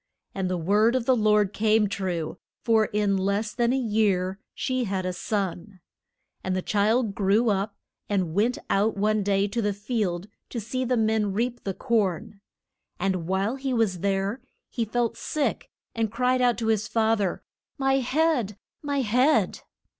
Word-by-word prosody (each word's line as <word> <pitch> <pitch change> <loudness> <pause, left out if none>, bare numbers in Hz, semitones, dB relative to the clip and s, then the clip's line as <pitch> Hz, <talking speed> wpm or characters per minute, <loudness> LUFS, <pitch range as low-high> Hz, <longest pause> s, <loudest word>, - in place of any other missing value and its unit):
And 190 -2 -2
the 185 - -1
word 210 +8 +3
of 255 -3 0
the 260 - +4
Lord 210 -3 +3
came 215 0 +3
true, 180 -4 -3 0.2
for 225 -2 +4
in 205 -2 0
less 200 +3 -1
than 240 -1 +1
a 265 - +1
year 205 -5 +1 0.2
she 255 -1 -1
had 190 -2 -2
a 185 - -1
son. 195 0 -3 0.6
And 185 0 -1
the 185 - -2
child 215 +1 +1
grew 210 +3 +2
up, 195 +1 -2 0.3
and 185 -6 0
went 225 +7 +1
out 205 +2 +1
one 215 +1 +2
day 200 0 +1
to 235 +3 -1
the 205 -1 0
field 205 -4 -2 0.2
to 240 - -4
see 235 +4 -3
the 250 0 +1
men 220 -2 +1
reap 240 +4 -2
the 195 -2 -3
corn. 205 -2 -1 0.6
And 185 -3 -1
while 195 +7 0
he 265 -1 -2
was 210 -6 +1
there 195 +5 -1 0.3
he 235 - -1
felt 235 +1 -1
sick, 300 -3 -2 0.2
and 225 -2 -1
cried 250 +2 +1
out 245 -1 +3
to 225 -1 -2
his 215 0 -2
fath 225 -1 +2
er, 190 -3 -2 0.3
My 270 -1 +2
head! 260 -5 +1 0.2
my 285 -2 -1
head! 250 +6 +2
215 Hz, 170 wpm, -26 LUFS, 195-235 Hz, 0.6 s, the